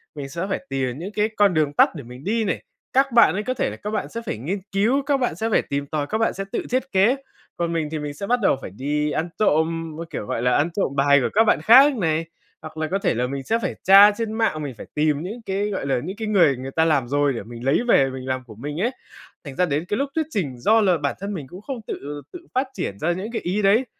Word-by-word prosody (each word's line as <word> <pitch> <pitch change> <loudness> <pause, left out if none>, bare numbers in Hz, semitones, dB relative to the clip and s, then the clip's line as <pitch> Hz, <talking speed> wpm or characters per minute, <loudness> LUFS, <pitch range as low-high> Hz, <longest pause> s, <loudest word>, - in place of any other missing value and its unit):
mình 140 -2 -6
sẽ 170 +6 -4
phải 185 - -3
tìm 130 -2 -2
những 190 +5 -6
cái 215 +1 +1
con 205 -2 +4
đường 150 -3 +1
tắt - - +5
để - - -7
mình 125 +3 -11
đi 225 +3 0
này. 185 - -2 0.3
Các 270 0 +3
bạn 235 0 +6
ấy 210 +3 -2
có 255 - -1
thể - - -1
là - - -7
các 210 - -5
bạn 215 - -2
sẽ 230 - -5
phải 150 - -3
nghiên 170 - -3
cứu, 225 +8 +2
các 280 -1 +2
bạn 245 -11 -1
sẽ 225 +5 -2
phải - - +3
tìm 140 0 -2
tòi, 150 -1 -2
các 220 - -1
bạn 225 - +1
sẽ 195 - -4
tự - - -2
thiết 255 +1 +1
kế. 200 +7 +4 0.4
Còn 170 -1 -1
mình 160 -2 -1
thì 155 - -3
mình 150 -1 -5
sẽ 195 +7 -6
bắt 245 +2 +2
đầu 190 - +3
phải - - -7
đi 150 +7 -1
ăn 165 +3 -2
trộm, 165 -4 +1
a, 170 - -5
kiểu, - - -5
gọi 115 - -3
là, 125 0 +3
ăn 155 +4 +1
trộm 165 -6 -2
bài 140 +1 +5
của - - 0
các 225 - +5
bạn 150 -9 +2
khác 265 - +7
này, 165 -4 0 0.4
hoặc 155 0 -10
là 155 0 -1
có 195 - +1
thể - - +1
là 125 +2 -1
mình 135 +1 -5
sẽ 225 +9 0
phải 185 - -2
tra 200 +2 +8
trên 220 +1 -4
mạng, 220 -9 0
mình 135 -4 -5
phải - - -9
tìm 150 -1 +1
những 220 +6 -6
cái, 200 +2 -1
gọi 190 -8 -3
là, 135 - +1
những 190 +5 -6
cái 220 - -4
người 170 -10 +4
người 130 +1 -6
ta 160 +3 +2
làm 145 -6 +2
rồi 145 +1 +1
để 115 - -5
mình 120 +2 -9
lấy 135 +8 +3
về 135 - +4
mình 130 0 -7
làm 130 0 -2
của 110 -4 -13
mình 145 - -5
ấy. 240 +4 +1 0.5
Thành 140 -2 -8
ra 180 - +2
đến 155 +1 -1
cái 205 - -1
lúc 275 +2 -1
thuyết 320 -1 +1
trình, 155 - -3
do 220 - +4
là 185 -4 +3
bản 140 -2 -2
thân 200 +2 -4
mình 150 -8 -6
cũng 180 +7 -11
không 245 0 -6
tự 145 +1 -6
tự 355 -1 -10
phát 260 +1 +1
triển 100 - -4
ra 170 +3 +1
những 195 +6 -4
cái 230 - -3
ý 190 +4 -1
đấy, 210 +6 +4
170 Hz, 295 wpm, -23 LUFS, 140-210 Hz, 0.5 s, tra